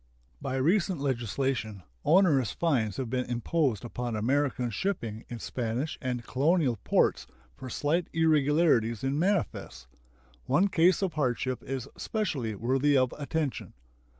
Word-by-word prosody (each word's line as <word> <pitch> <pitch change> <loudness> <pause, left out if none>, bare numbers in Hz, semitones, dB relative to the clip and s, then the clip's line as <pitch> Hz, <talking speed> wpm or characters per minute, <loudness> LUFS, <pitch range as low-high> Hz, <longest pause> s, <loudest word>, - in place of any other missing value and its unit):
By 130 - -3
recent 170 +5 +1
legislation 120 -5 -2 0.2
onerous 160 - +4
fines 120 - 0
have 130 - -2
been 125 +2 -1
imposed 120 - -1
upon 120 -1 -4
American 125 +2 0
shipping 115 - -3
in 120 - -5
Spanish 125 +6 -3
and 125 -2 -3
colonial 140 -2 +2
ports - - +1 0.3
for 130 - -8
slight 160 +7 0
irregularities 150 -7 +2
in 135 +2 0
manifests. 170 - -1 0.6
One 200 - +3
case 180 +3 +3
of 185 -4 -1
hardship 130 -3 -1
is 130 -2 -5
specially 155 - -2
worthy 135 +6 +2
of 130 -1 +2
attention. 150 -1 -3
135 Hz, 125 wpm, -28 LUFS, 120-160 Hz, 0.6 s, onerous